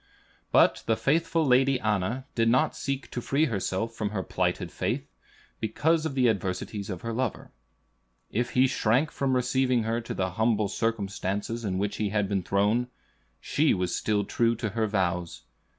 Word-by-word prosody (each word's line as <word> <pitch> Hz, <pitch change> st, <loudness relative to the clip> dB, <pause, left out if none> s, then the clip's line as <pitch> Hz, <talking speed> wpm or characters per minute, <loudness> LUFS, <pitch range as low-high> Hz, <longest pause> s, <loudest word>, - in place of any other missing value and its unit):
But -, -, +4 dB
the 115 Hz, -, +3 dB
faithful 165 Hz, +2 st, +1 dB
Lady 130 Hz, 0 st, +4 dB
Anna 110 Hz, +3 st, -1 dB
did 115 Hz, -1 st, +2 dB
not 125 Hz, +3 st, +2 dB
seek 135 Hz, 0 st, -4 dB
to 120 Hz, -, -3 dB
free 140 Hz, +6 st, +2 dB
herself 115 Hz, -2 st, -2 dB
from 105 Hz, -2 st, -2 dB
her 100 Hz, -3 st, -3 dB
plighted -, -, -1 dB
faith, -, -, -2 dB, 0.5 s
because 155 Hz, +9 st, +1 dB
of 140 Hz, -, -6 dB
the 130 Hz, -2 st, +4 dB
adversities 100 Hz, 0 st, -2 dB
of 90 Hz, -3 st, -5 dB
her 115 Hz, 0 st, -4 dB
lover. 125 Hz, -1 st, -3 dB, 0.8 s
If 120 Hz, +2 st, -1 dB
he 130 Hz, +1 st, +5 dB
shrank 130 Hz, +2 st, +1 dB
from 135 Hz, -2 st, 0 dB
receiving 125 Hz, -1 st, +2 dB
her 115 Hz, +2 st, -1 dB
to 115 Hz, -, -6 dB
the 95 Hz, -1 st, -1 dB
humble 110 Hz, +1 st, +1 dB
circumstances 105 Hz, 0 st, -2 dB
in 95 Hz, -3 st, -1 dB
which 100 Hz, +2 st, -2 dB
he 105 Hz, -1 st, 0 dB
had 105 Hz, -1 st, 0 dB
been 100 Hz, -1 st, 0 dB
thrown, 105 Hz, +7 st, +1 dB, 0.5 s
she 150 Hz, -, +2 dB
was 90 Hz, -1 st, -1 dB
still 105 Hz, -1 st, 0 dB
true 115 Hz, +3 st, +1 dB
to 110 Hz, -1 st, -3 dB
her 110 Hz, +1 st, 0 dB
vows. 90 Hz, -4 st, -1 dB
115 Hz, 170 wpm, -27 LUFS, 100-130 Hz, 0.8 s, he